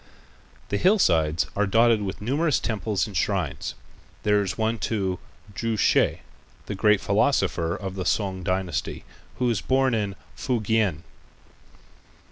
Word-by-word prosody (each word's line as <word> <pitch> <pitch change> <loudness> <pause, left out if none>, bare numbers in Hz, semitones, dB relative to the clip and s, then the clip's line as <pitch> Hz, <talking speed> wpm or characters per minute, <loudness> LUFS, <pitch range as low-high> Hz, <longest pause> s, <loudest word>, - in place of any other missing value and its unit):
The 100 - 0
hillsides 85 - +3
are 105 0 +1
dotted 115 +2 +4
with 100 0 -4
numerous 145 +6 +1
temples 105 -5 -1
and 100 - -9
shrines. 85 -5 -1 0.5
There 105 0 +3
is 95 -2 -3
one 110 0 0
to 95 -5 -1 0.3
Chu 115 +2 -2
Hsi, - - +3 0.4
the - - -4
great 105 +1 +3
philosopher 95 -6 +1
of 95 -2 -5
the 95 -1 -4
Sung 95 -1 0
dynasty, 90 0 -2 0.3
who 125 - 0
was 115 -6 +1
born 130 -1 +2
in 105 -3 -1 0.2
Fukien. 110 - 0
105 Hz, 130 wpm, -25 LUFS, 95-115 Hz, 0.5 s, dotted